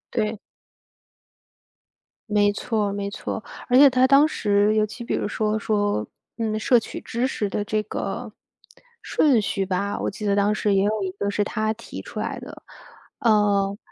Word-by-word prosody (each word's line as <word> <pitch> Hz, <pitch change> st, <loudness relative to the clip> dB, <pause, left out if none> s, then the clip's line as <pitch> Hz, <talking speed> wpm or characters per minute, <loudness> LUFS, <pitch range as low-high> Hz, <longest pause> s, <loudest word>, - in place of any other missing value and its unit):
对。 215 Hz, -2 st, 0 dB, 1.9 s
没 205 Hz, -1 st, +3 dB
错 210 Hz, -1 st, -1 dB
没 200 Hz, 0 st, -3 dB
错。 215 Hz, -, -5 dB, 0.2 s
而 250 Hz, -, +4 dB
且 280 Hz, +1 st, +9 dB
他 255 Hz, 0 st, +3 dB
当 280 Hz, +3 st, +6 dB
时 205 Hz, -6 st, +2 dB
尤 215 Hz, 0 st, +3 dB
其 235 Hz, +3 st, -9 dB
比 -, -, -3 dB
如 -, -, -1 dB
说 215 Hz, +1 st, -1 dB
说， 205 Hz, -, 0 dB, 0.3 s
嗯， 220 Hz, -1 st, -1 dB
摄 240 Hz, +2 st, +4 dB
取 -, -, -8 dB
知 240 Hz, +3 st, -1 dB
识 210 Hz, -6 st, -2 dB
的 205 Hz, -, -2 dB
这 215 Hz, 0 st, -1 dB
个 210 Hz, -, -5 dB, 0.7 s
顺 270 Hz, -7 st, +3 dB
序 195 Hz, -1 st, -1 dB
吧， 200 Hz, +2 st, -2 dB
我 -, -, -1 dB
记 210 Hz, +2 st, -7 dB
得 200 Hz, -1 st, +2 dB
当 205 Hz, +1 st, +2 dB
时 210 Hz, -1 st, +1 dB
也 195 Hz, -, +3 dB
有 210 Hz, 0 st, 0 dB
一 185 Hz, -, -2 dB
个 200 Hz, +1 st, -3 dB
是 205 Hz, +1 st, 0 dB
他 215 Hz, +1 st, -1 dB
提 230 Hz, -, -9 dB
出 -, -, -8 dB
来 -, -, -3 dB
的。 -, -, -11 dB, 0.6 s
嗯。 205 Hz, -3 st, +2 dB
210 Hz, 185 characters per minute, -23 LUFS, 200-225 Hz, 1.9 s, 且